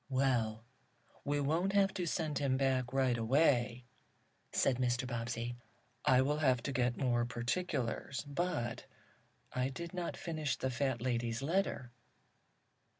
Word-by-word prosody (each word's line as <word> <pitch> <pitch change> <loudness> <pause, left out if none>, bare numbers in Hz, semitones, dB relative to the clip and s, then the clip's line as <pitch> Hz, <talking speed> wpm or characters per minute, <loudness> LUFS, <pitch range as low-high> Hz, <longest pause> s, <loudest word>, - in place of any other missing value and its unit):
"Well, 120 -5 +1 0.6
we 145 0 0
won't 165 +7 +1
have 195 -1 +4
to 180 -3 -2
send 155 -2 -1
him 135 -2 +1
back 130 -2 +1
right 130 -2 +2
away," 120 -1 +2 0.7
said 130 - +2
Mr. 125 0 +1
Bobbsey. 120 0 -3 0.5
"I 130 0 +6
will 150 +3 0
have 130 -5 +3
to 140 - -2
get 125 -1 +1
more 120 -3 +2
particulars. 120 +2 -2
But 145 -6 -2 0.7
I 130 +1 0
did 170 +5 -6
not 175 -2 -3
finish 155 -4 -2
the 130 - -1
fat 130 -1 0
lady's 120 -1 -1
letter." 160 -6 0
130 Hz, 135 wpm, -34 LUFS, 120-145 Hz, 0.7 s, I